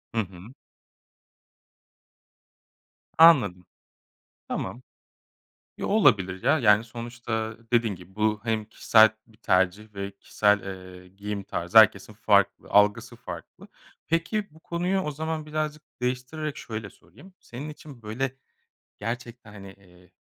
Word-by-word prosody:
Hı 110 Hz, -, +3 dB
hı. 95 Hz, +5 st, -11 dB, 2.6 s
Anladım. 125 Hz, -, +6 dB, 0.8 s
Tamam. 125 Hz, -, -4 dB, 1.0 s
Yo, -, -, -3 dB
olabilir 100 Hz, -, +3 dB
ya. 145 Hz, +5 st, +3 dB
Yani, 105 Hz, -4 st, +4 dB
sonuçta 115 Hz, -1 st, -5 dB, 0.2 s
dediğin 115 Hz, -3 st, +2 dB
gibi 90 Hz, +1 st, -15 dB
bu 105 Hz, 0 st, 0 dB
hem 110 Hz, -2 st, -1 dB
kişisel 110 Hz, 0 st, +5 dB, 0.2 s
bir 110 Hz, -2 st, -23 dB
tercih 95 Hz, +2 st, 0 dB
ve 100 Hz, 0 st, -4 dB
kişisel, 105 Hz, +1 st, +1 dB, 0.4 s
eee, 90 Hz, -, -18 dB
giyim 100 Hz, +2 st, -6 dB
tarzı 90 Hz, +5 st, +2 dB
herkesin 105 Hz, -1 st, +5 dB
farklı 100 Hz, -2 st, +2 dB
algısı 105 Hz, +4 st, +3 dB
farklı. 125 Hz, -, -10 dB, 0.4 s
Peki, 170 Hz, +6 st, 0 dB
bu 160 Hz, -, -20 dB
konuyu 175 Hz, +4 st, -1 dB
o 150 Hz, -, -3 dB
zaman 155 Hz, +1 st, -4 dB
birazcık 155 Hz, 0 st, -3 dB, 0.2 s
değiştirerek 130 Hz, +5 st, -3 dB
şöyle 110 Hz, -3 st, -6 dB
sorayım. 120 Hz, -, -19 dB
Senin 130 Hz, +6 st, -8 dB
için 145 Hz, -5 st, -12 dB
böyle 125 Hz, +5 st, -3 dB, 0.6 s
gerçekten 115 Hz, 0 st, -6 dB
hani, 100 Hz, -2 st, -10 dB
eee, 90 Hz, -2 st, -22 dB
110 Hz, 120 wpm, -26 LUFS, 100-135 Hz, 2.6 s, Anladım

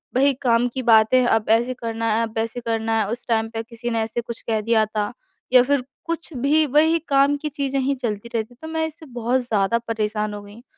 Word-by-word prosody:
वही 275 Hz, +2 st, +4 dB
काम 240 Hz, -1 st, +3 dB
की 260 Hz, -, -2 dB
बातें 230 Hz, +2 st, +5 dB
अब 225 Hz, -2 st, +1 dB
ऐसे 240 Hz, +3 st, 0 dB
करना 230 Hz, -2 st, -4 dB
है 225 Hz, -, +1 dB
अब 225 Hz, 0 st, -5 dB
ऐसे 230 Hz, +2 st, -2 dB
करना 225 Hz, -1 st, -1 dB
है 210 Hz, -, 0 dB
उस 240 Hz, +2 st, -6 dB
टाइम 225 Hz, -1 st, +1 dB
पे 225 Hz, 0 st, -4 dB
किसी 230 Hz, +1 st, -6 dB
ने 230 Hz, -, 0 dB
ऐसे 225 Hz, +2 st, -3 dB
कुछ 235 Hz, 0 st, -8 dB
कह 220 Hz, -1 st, -1 dB
दिया 220 Hz, 0 st, +2 dB
था। 210 Hz, -1 st, -2 dB, 0.4 s
या 250 Hz, -, +9 dB
फिर 280 Hz, 0 st, +1 dB, 0.2 s
कुछ 335 Hz, -1 st, -4 dB
भी 290 Hz, +4 st, +2 dB
वही 310 Hz, +4 st, +4 dB
काम 275 Hz, +1 st, +4 dB
की 305 Hz, -, -2 dB
चीज़ें 275 Hz, -1 st, -2 dB
ही 275 Hz, +1 st, 0 dB
चलती 235 Hz, -2 st, -4 dB
रहती, 225 Hz, +2 st, -3 dB
तो 315 Hz, +6 st, -10 dB
मैं 320 Hz, 0 st, -1 dB
इससे 315 Hz, 0 st, -12 dB
बहुत 245 Hz, -1 st, -1 dB
ज़्यादा 225 Hz, -2 st, +1 dB
परेशान 215 Hz, -1 st, -1 dB
हो 205 Hz, -, -6 dB
गई 205 Hz, 0 st, -13 dB
हूँ। 235 Hz, -, -15 dB
235 Hz, 235 wpm, -22 LUFS, 225-270 Hz, 0.4 s, या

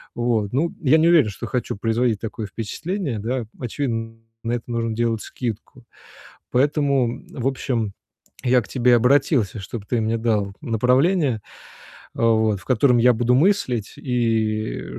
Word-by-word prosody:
Вот 115 Hz, -4 st, 0 dB
ну 160 Hz, +6 st, 0 dB
я 150 Hz, +1 st, +5 dB
не 165 Hz, +2 st, +4 dB
уверен, 160 Hz, -11 st, +5 dB
что 100 Hz, -, -7 dB
хочу 125 Hz, -5 st, -3 dB
производить 115 Hz, +1 st, 0 dB
такое 110 Hz, -1 st, -5 dB
впечатление, 135 Hz, -, -4 dB
да? 120 Hz, +2 st, -2 dB
Очевидно, 115 Hz, -3 st, -3 dB, 0.3 s
на 115 Hz, +1 st, -1 dB
это 120 Hz, -, -2 dB
нужно 115 Hz, -1 st, -1 dB
делать 115 Hz, -1 st, 0 dB
скидку. 120 Hz, +1 st, -6 dB, 0.7 s
Поэтому, 140 Hz, 0 st, +2 dB
м, -, -, -8 dB
в 125 Hz, 0 st, -3 dB
общем, 120 Hz, -6 st, -2 dB, 0.5 s
я 125 Hz, 0 st, +4 dB
к -, -, -12 dB
тебе 125 Hz, -1 st, +3 dB
обратился, 125 Hz, -, +2 dB
чтоб 100 Hz, +2 st, -7 dB
ты 120 Hz, +1 st, 0 dB
мне 110 Hz, +1 st, 0 dB
дал 105 Hz, -4 st, 0 dB
направление, 130 Hz, -, +2 dB, 0.7 s
э, -, -, -7 dB
вот 110 Hz, -3 st, +2 dB
в -, -, -17 dB
котором 125 Hz, 0 st, +3 dB
я 125 Hz, +1 st, +5 dB
буду 120 Hz, +2 st, +2 dB
мыслить. 130 Hz, -, +1 dB
И, 110 Hz, -3 st, -1 dB
э, -, -, -5 dB
120 Hz, 155 wpm, -22 LUFS, 110-130 Hz, 0.7 s, я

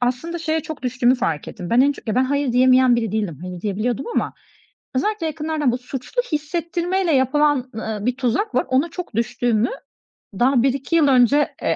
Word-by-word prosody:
Aslında 255 Hz, +8 st, -2 dB
şeye 320 Hz, -1 st, -1 dB
çok 310 Hz, 0 st, -8 dB
düştüğümü 250 Hz, 0 st, +2 dB
fark 165 Hz, -12 st, -2 dB
ettim. 175 Hz, -, -8 dB
Ben 235 Hz, -, +4 dB
en 285 Hz, +1 st, +3 dB
çok, 265 Hz, -, -13 dB
ya 215 Hz, -, 0 dB
ben 255 Hz, +1 st, +3 dB
hayır 280 Hz, -1 st, 0 dB
diyemeyen 255 Hz, 0 st, +5 dB
biri 225 Hz, -3 st, -2 dB
değilim, 205 Hz, -9 st, -2 dB
hayır 180 Hz, -1 st, -7 dB
diyebiliyordum 215 Hz, +6 st, -2 dB
ama -, -, -1 dB, 0.6 s
özellikle 390 Hz, +6 st, 0 dB
yakınlardan 305 Hz, -3 st, -1 dB
bu 245 Hz, -, -1 dB
suçlu 255 Hz, -, -4 dB
hissettirmeyle 340 Hz, +3 st, -1 dB
yapılan, 275 Hz, 0 st, +2 dB
ııı, 220 Hz, -2 st, -4 dB
bir 250 Hz, 0 st, 0 dB
tuzak 260 Hz, -, -1 dB
var, 255 Hz, -, +2 dB
ona 270 Hz, +6 st, +2 dB
çok 355 Hz, -, -7 dB
düştüğümü 230 Hz, 0 st, 0 dB, 0.7 s
daha 250 Hz, -1 st, +3 dB
1-2 275 Hz, +4 st, 0 dB
yıl 305 Hz, -3 st, +4 dB
önce, 270 Hz, +2 st, +3 dB
e, -, -, +1 dB
260 Hz, 185 wpm, -21 LUFS, 240-300 Hz, 0.7 s, diyemeyen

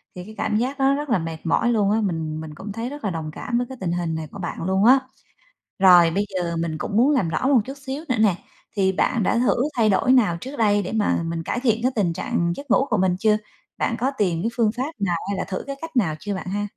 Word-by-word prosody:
thì 180 Hz, -, -7 dB
cái 215 Hz, +3 st, -12 dB
cảm 215 Hz, 0 st, 0 dB
giác 265 Hz, +4 st, -2 dB
đó 270 Hz, +1 st, +4 dB
rất 290 Hz, 0 st, -3 dB
là 230 Hz, -, +3 dB
mệt 165 Hz, -1 st, -5 dB
mỏi 235 Hz, +8 st, +2 dB
luôn 205 Hz, -3 st, +2 dB
á, 220 Hz, +1 st, +2 dB
mình 160 Hz, -5 st, -2 dB
mình 155 Hz, -1 st, -8 dB
cũng 195 Hz, +5 st, -7 dB
thấy 230 Hz, +4 st, -4 dB
rất 290 Hz, -2 st, -9 dB
là 200 Hz, -, 0 dB
đồng 160 Hz, -3 st, -4 dB
cảm 235 Hz, +9 st, -3 dB
với 245 Hz, 0 st, -1 dB
cái 265 Hz, -, -8 dB
tình 175 Hz, -, -1 dB
hình 170 Hz, -2 st, -2 dB
này 160 Hz, -1 st, -5 dB
của 200 Hz, -, -9 dB
bạn 170 Hz, -2 st, -5 dB
luôn 190 Hz, +3 st, +1 dB
á. 260 Hz, +2 st, +7 dB, 0.8 s
Rồi 175 Hz, -3 st, +7 dB
bây 200 Hz, +4 st, -1 dB
giờ 170 Hz, -2 st, -2 dB
mình 160 Hz, -2 st, -3 dB
cũng 200 Hz, -, -3 dB
muốn 255 Hz, +6 st, +5 dB
làm 250 Hz, -, +2 dB
rõ 165 Hz, +11 st, -1 dB
một 265 Hz, -5 st, +5 dB
chút 270 Hz, +3 st, -8 dB
xíu 275 Hz, +4 st, -4 dB
nữa 250 Hz, -, +1 dB
nè, 210 Hz, -5 st, +3 dB, 0.4 s
thì 190 Hz, -1 st, +2 dB
bạn 230 Hz, +4 st, +1 dB
đã 215 Hz, -, +1 dB
thử 250 Hz, -, +2 dB, 0.2 s
thay 220 Hz, -2 st, +3 dB
đổi 250 Hz, +6 st, +3 dB
nào 215 Hz, -10 st, +4 dB
trước 270 Hz, +3 st, -7 dB
đây 205 Hz, -3 st, +2 dB
để 185 Hz, -, -5 dB
mà 210 Hz, -5 st, +1 dB
mình 165 Hz, 0 st, -3 dB
cải 240 Hz, +8 st, -2 dB
thiện 230 Hz, -3 st, +1 dB
cái 255 Hz, -, +2 dB
tình 190 Hz, -7 st, +1 dB
trạng 170 Hz, +1 st, -1 dB
giấc 280 Hz, -3 st, -10 dB
ngủ 270 Hz, -, +4 dB
của 215 Hz, -, +2 dB
mình 185 Hz, -1 st, +2 dB
chưa? 215 Hz, +1 st, +3 dB, 0.4 s
Bạn 230 Hz, -, 0 dB
có 260 Hz, +3 st, +1 dB
tìm 175 Hz, -4 st, +1 dB
cái 230 Hz, -, 0 dB
phương 225 Hz, -3 st, +3 dB
pháp 275 Hz, +6 st, -3 dB
nào 180 Hz, -4 st, 0 dB
hay 200 Hz, -1 st, -2 dB
là -, -, -1 dB
thử 185 Hz, -, -5 dB
cái 275 Hz, -1 st, -5 dB
cách 325 Hz, -4 st, -8 dB
nào 175 Hz, -10 st, +2 dB
chưa 205 Hz, 0 st, -3 dB
bạn 190 Hz, -, -6 dB
ha? 205 Hz, +2 st, -2 dB
205 Hz, 285 wpm, -23 LUFS, 175-245 Hz, 0.8 s, á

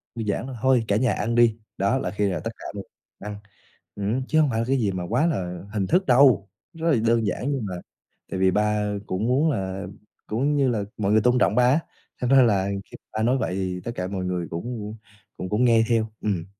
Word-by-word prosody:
đơn 115 Hz, -2 st, -4 dB
giản 100 Hz, +3 st, -1 dB
thôi: 130 Hz, -, -7 dB
"Thôi, 130 Hz, -3 st, +3 dB
cả 100 Hz, -, +2 dB
nhà 120 Hz, -1 st, +2 dB
ăn 115 Hz, +4 st, -1 dB
đi," 120 Hz, -2 st, +4 dB, 0.2 s
đó 100 Hz, +7 st, +2 dB
là 90 Hz, -, -3 dB
khi 105 Hz, 0 st, 0 dB
là 95 Hz, -, -2 dB
tất 115 Hz, -, -4 dB
cả -, -, -12 dB
cùng 100 Hz, -1 st, -7 dB, 0.3 s
ăn. 105 Hz, +1 st, -6 dB, 0.6 s
Ừm, 105 Hz, +6 st, -1 dB
chứ 155 Hz, -, +2 dB
không 150 Hz, -3 st, +4 dB
phải 110 Hz, -, -1 dB
là 115 Hz, -, 0 dB
cái 135 Hz, -, +2 dB
gì 105 Hz, -6 st, +1 dB
mà 90 Hz, -1 st, -4 dB
quá 125 Hz, +8 st, +2 dB
là 90 Hz, -, -2 dB
hình 100 Hz, -3 st, -1 dB
thức 185 Hz, +3 st, +2 dB
đâu, 125 Hz, -6 st, +5 dB, 0.2 s
rất 165 Hz, 0 st, 0 dB
là 145 Hz, -, +4 dB
đơn 115 Hz, -1 st, +3 dB
giản, 125 Hz, +8 st, -2 dB
nhưng 135 Hz, -6 st, -2 dB
mà 95 Hz, -3 st, -4 dB, 0.6 s
tại 95 Hz, -, -2 dB
vì 95 Hz, 0 st, +4 dB
ba 105 Hz, 0 st, +1 dB
cũng 95 Hz, +5 st, -1 dB
muốn 140 Hz, +6 st, +3 dB
là 95 Hz, -4 st, -3 dB, 0.4 s
cũng 135 Hz, +7 st, 0 dB
như 135 Hz, -2 st, +3 dB
là 110 Hz, -4 st, 0 dB
mọi 100 Hz, -1 st, 0 dB
người 110 Hz, -, +5 dB
tôn 125 Hz, +3 st, +3 dB
trọng 105 Hz, -3 st, +3 dB
ba 125 Hz, -, +4 dB
á, 140 Hz, +5 st, +4 dB, 0.4 s
thành 125 Hz, -, 0 dB
ra 135 Hz, 0 st, +7 dB
là 100 Hz, -5 st, +3 dB, 0.2 s
khi -, -, -14 dB
m -, -, -64 dB
ba 110 Hz, -, -1 dB
nói 125 Hz, +4 st, +3 dB
vậy 95 Hz, -7 st, -2 dB
thì 90 Hz, -1 st, -3 dB
tất 120 Hz, -, -4 dB
cả 90 Hz, -, -3 dB
mọi 95 Hz, -1 st, -3 dB
người 90 Hz, -2 st, -2 dB
cũng 110 Hz, +3 st, -5 dB, 0.4 s
cũng 95 Hz, -, -5 dB
cũng 110 Hz, +4 st, +2 dB
nghe 115 Hz, -2 st, +5 dB
theo, 115 Hz, -2 st, +2 dB, 0.2 s
ừm. 95 Hz, -6 st, -1 dB
110 Hz, 250 wpm, -24 LUFS, 100-125 Hz, 0.6 s, ra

